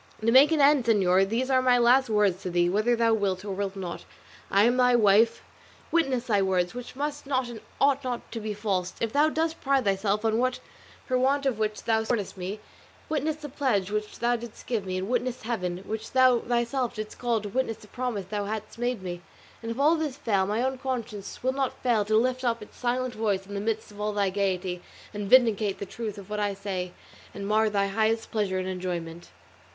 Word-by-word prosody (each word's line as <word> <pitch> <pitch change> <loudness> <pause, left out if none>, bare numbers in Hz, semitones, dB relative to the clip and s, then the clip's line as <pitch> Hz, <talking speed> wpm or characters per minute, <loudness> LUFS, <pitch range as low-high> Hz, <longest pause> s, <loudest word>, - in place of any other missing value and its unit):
To 225 +1 +2
make 270 +5 +7
an 320 - +2
end, 280 -3 +5
señor, 195 -4 +3
these 255 +4 0
are 260 -1 +4
my 250 -1 +4
last 245 +2 +4
words 205 -4 +2
to 185 - -4
thee: 175 0 +2
whether 215 +6 +2
thou 230 -1 +3
wilt, 200 -3 -1
or 200 - -3
wilt 195 0 -3
not, 180 -3 -6 0.5
I 200 +1 +4
am 240 +2 +4
thy 250 -1 +4
wife; 225 +1 +4 0.5
witness 270 -7 +1
thy 205 -5 +2
words, 185 -1 +1
which 245 0 -8
must 290 0 -4
not 260 -3 0
and 225 -3 -8 0.2
ought 280 0 +3
not 245 -2 -4
to 230 - -4
be 215 -1 -4
false, 190 -4 -2
if 225 0 -2
thou 300 +2 +4
dost 320 +1 -1
pride 275 -3 +2
thyself 200 +2 0
on 220 0 +2
that 255 0 0 0.5
for 255 -1 +1
want 275 +2 +2
of 255 -5 0
which 215 -1 -2
thou 225 -1 +2
scornest 220 -4 -2
me; 190 +3 -5 0.5
witness 310 0 0
the 305 -1 -8
pledge 250 -9 0
which 210 0 -3
thou 240 +1 +1
didst 235 -2 -9
give 220 -6 -2
me, 185 0 -2
and 185 +1 -3
witness 250 +1 -1
Heaven, 185 -6 -3
which 220 +1 -5
thou 255 -2 +5
thyself 240 +1 -1
didst 215 -1 -6
call 240 -2 +1
to 210 -1 -6
witness 230 0 -1
the 210 - -16
promise 245 -5 -3
thou 205 +1 -3
hadst 215 +2 -5
made 240 -4 -1
me; 175 -1 -5 0.4
and 230 - -5
if 230 +3 -4
all 300 +3 +5
this 310 -5 -2
fail, 195 -7 +1
thy 215 +4 0
own 260 0 -1
conscience 235 -7 -5
will 260 +1 +1
not 270 -1 -3
fail 230 -5 +2
to 215 +1 +2
lift 255 +2 +1
up 235 -3 0
its - - -16
silent 250 0 -1
voice 205 -4 -1
in 200 - -10
the 200 - -2
midst 220 0 -2
of 205 0 -10
all 210 0 -1
thy 200 -2 +1
gaiety, 185 -2 -1 0.3
and 205 -1 -4
vindicate 220 -5 +4
the 200 - -5
truth 215 0 -6
of 200 - -10
what 210 0 -3
I 205 -1 0
say 190 -2 -4 0.4
and 200 0 -5
mar 215 +1 +3
thy 200 -1 +1
highest 220 +3 0
pleasure 205 -4 0
and 185 0 -2
enjoyment." 175 -2 -5
220 Hz, 225 wpm, -27 LUFS, 200-250 Hz, 0.5 s, make